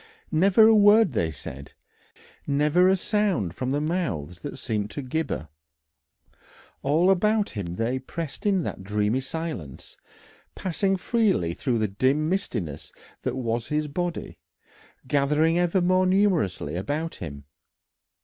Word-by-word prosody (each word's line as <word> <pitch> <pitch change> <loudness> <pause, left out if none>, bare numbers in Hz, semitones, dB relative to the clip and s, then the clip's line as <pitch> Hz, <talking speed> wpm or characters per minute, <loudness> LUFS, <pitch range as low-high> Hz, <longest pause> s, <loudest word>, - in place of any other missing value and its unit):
Never 195 +6 +5
a 225 - +7
word 210 -2 +6
they 85 -9 0
said, 70 -2 -9 0.7
never 150 +5 +3
a 190 +1 +4
sound 190 - 0
from 130 - -3
the 140 +2 0
mouths 150 - -3
that 145 - -6
seemed 105 -5 -2
to 145 - -6
gibber. 130 - -3 1.3
All 160 +7 +3
about 210 +3 +2
him 95 -5 -5
they 120 +6 -1
pressed 165 +8 -5
in 195 -4 +2
that - - -5
dreamy 105 +4 0
silence, 135 - -6 0.6
passing 190 +2 0
freely 195 - +1
through 120 +6 -1
the 110 -1 +1
dim 130 +10 +1
mistiness 115 - -3 0.3
that - - -2
was 120 -2 -2
his 150 0 -1
body, 175 +4 -4 0.7
gathering 150 +5 +2
ever 175 +1 +2
more 185 +1 +3
numerously 175 - +1
about 145 - -3
him. 70 -4 -7
150 Hz, 130 wpm, -25 LUFS, -, 1.3 s, a